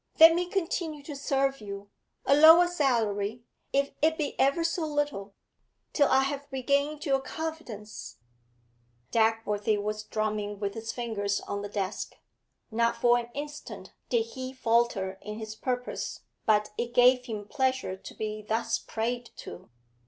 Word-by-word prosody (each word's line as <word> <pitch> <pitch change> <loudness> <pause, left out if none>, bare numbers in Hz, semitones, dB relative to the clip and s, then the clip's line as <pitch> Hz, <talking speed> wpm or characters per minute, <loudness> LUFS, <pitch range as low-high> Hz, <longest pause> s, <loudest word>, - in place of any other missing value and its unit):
Let 325 +1 +10
me 350 +1 0
continue 330 -6 -2
to 290 0 -7
serve 275 -1 0
you 200 -1 -8 0.3
a 275 - +5
lower 320 +4 +9
salary 230 -9 0 0.3
if 280 0 +1
it 320 +1 +3
be 295 -2 -1
ever 275 +5 +3
so 335 0 0
little 290 -10 -2 0.6
till 285 -2 +4
I 265 - +4
have 280 +1 -3
regained 280 +3 0
your 270 -2 +3
confidence 270 -9 -6 0.5
' 120 +1 -40
Dagworthy 220 -2 +2
was 210 +1 -2
drumming 215 -1 -2
with 200 -1 -2
his 225 0 -4
fingers 205 -4 -1
on 200 - -4
the 205 - -5
desk. 200 -1 -3 0.6
Not 235 +1 +2
for 240 +1 +4
an 235 0 -6
instant 295 +1 -7 0.2
did 235 -2 +2
he 255 +2 -6
falter 230 -6 +1
in 210 +1 -6
his 220 -1 -6
purpose, 250 +2 -3 0.3
but 210 -1 +3
it 240 0 -3
gave 250 0 +6
him 215 -4 -5
pleasure 260 -6 0
to 190 - -11
be 215 0 -4
thus 225 +2 0
prayed 240 +2 -3
to. 185 - -10
235 Hz, 150 wpm, -28 LUFS, 210-280 Hz, 0.6 s, Let